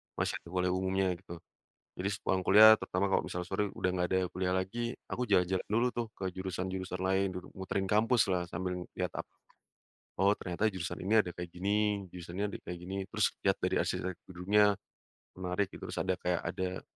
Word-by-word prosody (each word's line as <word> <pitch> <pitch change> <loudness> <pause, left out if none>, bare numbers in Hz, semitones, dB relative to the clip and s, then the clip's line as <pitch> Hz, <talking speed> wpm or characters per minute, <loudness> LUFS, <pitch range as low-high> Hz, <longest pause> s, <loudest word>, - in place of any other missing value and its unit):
masih - - 0
ada - - -17
kuliah 90 0 +1
umumnya 95 +1 +1
gitu, 95 -1 -10 0.7
jadi 95 - 0
sepulang 95 -1 0
kuliah 105 +2 +10
terutama 90 +2 -1
kalau - - +3
misalnya 90 0 -3
sore 100 +1 0
udah 95 - +1
nggak 90 -1 0
ada 95 - +2
kuliah 90 0 0
lagi, 95 +6 -2 0.3
aku 125 - -2
jalan-jalan 95 -2 +2
dulu 115 +4 +2
tuh 120 -1 -2
ke 95 - -5
jurusan-jurusan 95 0 -4
lain 95 +1 +3
dulu, 90 - -6
muterin 95 0 -2
kampuslah 105 -5 +3
sambil 90 +2 -3 0.2
lihat - - -1
apa, - - -8 0.9
oh 100 +2 +4
ternyata 90 +4 0
jurusan 95 -3 -4
ini 100 +4 +1
ada 90 - -5
kayak 90 0 -6
gini, 100 +3 0
jurusan 85 -1 -8
ini 100 - 0
ada - - -5
kayak 90 - -6
gini 90 +3 -6
terus - - +2
lihat - - +2
dari - - -1
arsitekturnya, 95 +3 +1 0.6
menarik 90 +2 -1
gitu - - -9
terus - - -3
ada 95 -1 0
kayak 90 -1 0
ada, 95 +1 -3
95 Hz, 185 wpm, -32 LUFS, 90-100 Hz, 0.9 s, kuliah